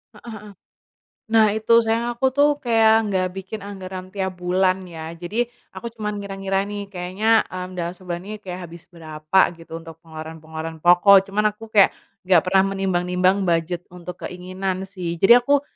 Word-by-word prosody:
Heeh 230 Hz, +2 st, -11 dB
heeh. 210 Hz, -, -11 dB, 0.8 s
Nah 220 Hz, -1 st, +6 dB
itu, 220 Hz, +1 st, +1 dB
sayang 225 Hz, +1 st, 0 dB
aku 240 Hz, +3 st, -2 dB
tuh 290 Hz, +1 st, +6 dB
kayak 225 Hz, -2 st, +4 dB, 0.2 s
nggak 185 Hz, -2 st, +1 dB
bikin 195 Hz, +2 st, -6 dB
anggaran 185 Hz, -2 st, -7 dB
tiap 190 Hz, -2 st, -2 dB
bulan 185 Hz, +1 st, +1 dB
ya. 160 Hz, -1 st, -7 dB
Jadi, 210 Hz, +8 st, -2 dB, 0.3 s
aku 235 Hz, -, -7 dB
cuma 215 Hz, -2 st, -4 dB
ngira-ngira 195 Hz, -1 st, -2 dB
nih 205 Hz, -1 st, -5 dB
kayaknya, 195 Hz, +5 st, +2 dB
mmm, 185 Hz, 0 st, -6 dB
dalam 170 Hz, 0 st, -3 dB
sebulan 175 Hz, -2 st, -6 dB
ini 215 Hz, -, -5 dB
kayak 185 Hz, -2 st, -7 dB
habis 170 Hz, 0 st, -13 dB
berapa 155 Hz, +1 st, -1 dB, 0.2 s
gitu 165 Hz, -1 st, -9 dB
untuk 165 Hz, -1 st, -12 dB
pengeluaran-pengeluaran 160 Hz, 0 st, -8 dB
pokok. 190 Hz, +3 st, +6 dB
Cuma 205 Hz, +2 st, 0 dB
aku 210 Hz, +1 st, -1 dB
kayak 200 Hz, -2 st, +7 dB, 0.4 s
nggak 180 Hz, -3 st, +5 dB
pernah 190 Hz, +1 st, +4 dB
menimbang-nimbang 185 Hz, 0 st, +1 dB
budget 170 Hz, +1 st, -1 dB
untuk 180 Hz, 0 st, -9 dB
keinginan 185 Hz, +1 st, -4 dB
sih. 180 Hz, -3 st, -5 dB
Jadi 195 Hz, +5 st, +8 dB
aku 285 Hz, +3 st, +2 dB
185 Hz, 165 wpm, -22 LUFS, 175-205 Hz, 0.8 s, Jadi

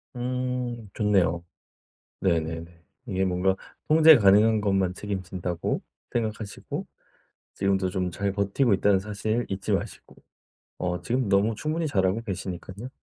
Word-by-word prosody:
음. 125 Hz, -2 st, -3 dB
좋네요. 95 Hz, -6 st, +2 dB, 0.8 s
네네네. 85 Hz, -1 st, -2 dB, 0.2 s
이게 95 Hz, -3 st, 0 dB
뭔가 95 Hz, +1 st, +1 dB, 0.3 s
'통제 160 Hz, 0 st, +8 dB
가능한 105 Hz, +1 st, +5 dB
것만 95 Hz, -3 st, +1 dB
책임진다.'고 95 Hz, -3 st, -3 dB, 0.3 s
생각하시고 110 Hz, -3 st, -3 dB, 0.7 s
지금도 95 Hz, -1 st, +1 dB
좀 90 Hz, 0 st, -1 dB
잘 100 Hz, +3 st, -2 dB
버티고 100 Hz, +4 st, +2 dB
있다는 100 Hz, 0 st, +3 dB
사실 105 Hz, +4 st, -2 dB
잊지 95 Hz, 0 st, -2 dB
마시고. -, -, -4 dB, 0.6 s
어 90 Hz, -1 st, -2 dB
지금 125 Hz, 0 st, 0 dB
너무 100 Hz, +3 st, +3 dB
충분히 155 Hz, +6 st, -2 dB
잘하고 95 Hz, -5 st, +1 dB
계시니깐요. 95 Hz, +2 st, -6 dB
100 Hz, 285 characters per minute, -26 LUFS, 95-115 Hz, 0.8 s, 통제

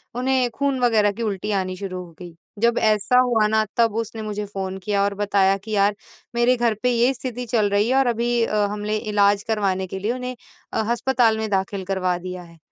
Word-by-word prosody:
उन्हें 255 Hz, 0 st, +1 dB
खून 280 Hz, -1 st, 0 dB
वग़ैरह 215 Hz, -4 st, +3 dB
की 230 Hz, +3 st, -5 dB
उल्टी 210 Hz, 0 st, -2 dB
आनी 185 Hz, 0 st, -4 dB
शुरू 185 Hz, -2 st, -5 dB
हो 170 Hz, -, -15 dB
गई। 175 Hz, -2 st, -10 dB, 0.2 s
जब 235 Hz, +1 st, +2 dB
ऐसा 215 Hz, +3 st, +3 dB
हुआ 240 Hz, -4 st, +3 dB
ना 220 Hz, 0 st, +2 dB
तब 230 Hz, -2 st, +3 dB
उसने 225 Hz, -1 st, -4 dB
मुझे 210 Hz, -1 st, -4 dB
फोन 190 Hz, -1 st, -5 dB
किया 200 Hz, +1 st, 0 dB
और 200 Hz, -, 0 dB
बताया 200 Hz, -1 st, +2 dB
कि 210 Hz, +3 st, -10 dB
यार 205 Hz, 0 st, +2 dB, 0.4 s
मेरे 240 Hz, +1 st, +3 dB
घर 235 Hz, -2 st, +1 dB
पे 250 Hz, -, +3 dB
ये 240 Hz, +2 st, +3 dB
स्थिति 250 Hz, -1 st, -5 dB
चल 220 Hz, -3 st, +1 dB
रही 205 Hz, +3 st, +2 dB
है 260 Hz, -, +2 dB
और 270 Hz, -1 st, +3 dB
अभी 235 Hz, 0 st, +1 dB
अ, 210 Hz, -2 st, +1 dB
हमने 210 Hz, +1 st, -2 dB
इलाज़ 205 Hz, -2 st, +2 dB
करवाने 195 Hz, -4 st, 0 dB
के 190 Hz, +1 st, -6 dB
लिए 210 Hz, +4 st, -1 dB
उन्हें 250 Hz, 0 st, -5 dB, 0.4 s
अ, -, -, 0 dB
अस्पताल 240 Hz, -2 st, +2 dB
में 220 Hz, -1 st, -3 dB
दाख़िल 195 Hz, 0 st, -1 dB
करवा 185 Hz, -2 st, 0 dB
दिया 180 Hz, 0 st, -7 dB
है। 170 Hz, -1 st, -16 dB
210 Hz, 215 wpm, -22 LUFS, 200-235 Hz, 0.4 s, वग़ैरह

